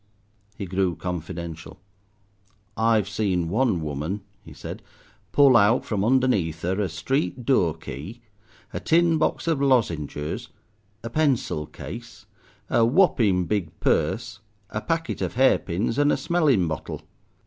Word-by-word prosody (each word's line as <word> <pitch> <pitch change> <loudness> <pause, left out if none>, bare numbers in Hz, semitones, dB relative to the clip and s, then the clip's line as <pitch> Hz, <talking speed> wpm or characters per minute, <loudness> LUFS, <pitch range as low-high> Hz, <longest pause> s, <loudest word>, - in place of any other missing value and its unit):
He 100 - -4
grew 95 -1 0
confidential. 85 -2 -6 1.0
"I've 110 -3 +2
seen 95 -4 -1
one 110 -3 +1
woman," 75 +7 -3 0.2
he 80 - -13
said, 70 - -8 0.5
"pull 140 -3 +6
out 110 +3 +4
from 100 -3 -1
underneath 105 -11 +1
'er 95 +3 0
a 100 - -1
street 115 - -2
doorkey, 85 - -1 0.5
a - - -2
tin 165 0 +3
box - - 0
of 160 -4 +1
lozengers, 85 - 0 0.6
a 115 - -5
pencil 130 - 0
case, - - -9 0.4
a 115 - +3
whopping 115 - +3
big 95 -5 -3
purse, 105 - 0 0.3
a 110 - -3
packet 165 +3 -2
of - - -2
hair 130 +2 +4
pins, 100 +8 -2
and 145 0 +4
a - - +2
smelling 145 - +2
bottle. 80 -2 -5
105 Hz, 130 wpm, -24 LUFS, 85-130 Hz, 1.0 s, pull